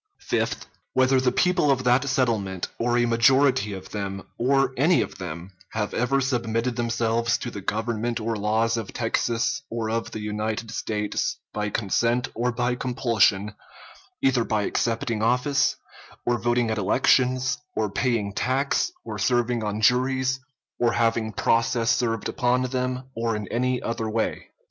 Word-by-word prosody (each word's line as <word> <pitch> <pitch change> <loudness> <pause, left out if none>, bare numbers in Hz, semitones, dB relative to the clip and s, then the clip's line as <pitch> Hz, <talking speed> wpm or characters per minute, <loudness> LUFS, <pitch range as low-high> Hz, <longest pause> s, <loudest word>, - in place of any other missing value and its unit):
Fifth. - - 0 0.3
Whether 130 0 +4
the 125 -1 +2
people 180 +1 +2
of 130 -2 +2
that 125 +3 +3
settlement, 110 -8 0
or 120 +1 +1
a 120 - +3
majority 120 -1 +3
of 95 -1 -9
them, 100 -2 -4
or 135 +1 +2
any 160 +7 +4
of - - -10
them, 85 +1 -6 0.2
have 105 -2 -2
ever 130 +3 +1
submitted 120 -2 -1
themselves 115 -1 +1
to 120 - -5
the 100 - -7
government 115 +3 -2
or 115 +1 -2
laws 110 +2 +1
of 110 -4 -5
Texas 120 +3 0
or 115 -1 -2
of 115 0 -2
the - - -6
United 105 +1 -3
States, 105 -1 -2 0.2
by 105 0 -1
consent 115 +5 0
or 125 +1 0
by 120 +1 0
compulsion, 115 -5 +1 0.7
either 130 -3 +3
by 105 -2 0
accepting 115 0 -1
office, 125 +5 +2 0.5
or 120 0 +1
voting 120 0 +1
at 110 - -1
elections, 130 +5 +2 0.2
or 110 - +1
paying 105 -1 -1
tax, 135 - 0
or - - -5
serving 120 -2 +1
on 105 0 -2
juries, 130 +3 +2 0.4
or 120 -1 +2
having 115 -1 +1
process 115 +3 +2
served 115 -3 -1
upon 125 +1 +1
them, 130 0 -2
or 115 -1 -1
in 105 -1 -4
any 125 +1 0
other 115 -1 -2
way. 110 +1 -2
115 Hz, 155 wpm, -25 LUFS, 110-125 Hz, 0.7 s, Whether